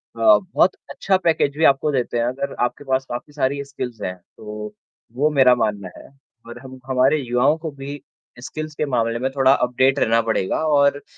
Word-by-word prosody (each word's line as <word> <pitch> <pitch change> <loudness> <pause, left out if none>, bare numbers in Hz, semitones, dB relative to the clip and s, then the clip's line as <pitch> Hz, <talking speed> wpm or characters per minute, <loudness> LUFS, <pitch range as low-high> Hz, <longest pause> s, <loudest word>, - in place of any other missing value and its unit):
अ, - - -12
बहुत 195 - +3
अच्छा 195 - 0
पैकेज 160 -5 +1
भी 160 - 0
आपको 140 +2 +3
देते 125 -3 -1
हैं, 115 - +1
अगर 135 +3 -3
आपके 125 +3 -3
पास 130 0 0
काफ़ी 135 +5 -6
सारी 140 0 -1
स्किल्स 125 -6 -7
हैं, 90 -2 -4 0.2
तो 105 0 -8 0.4
वो 150 +4 +2
मेरा 135 -4 +5
मानना 105 -5 -2
है। - - -13 0.4
और 120 +1 -9
हम 130 0 -11
हमारे 130 +3 +2
युवाओं 130 +4 +1
को 160 -1 -6
भी 140 0 -7 0.4
स्किल्स 155 +3 -7
के 150 - -1
मामले 115 -3 -1
में 130 +1 -1
थोड़ा 135 0 +5
अपडेट 130 +2 +1
रहना 115 +1 +3
पड़ेगा 95 -4 0 0.2
और 140 0 +3
अ, - - -14
135 Hz, 195 wpm, -21 LUFS, 120-145 Hz, 0.4 s, मेरा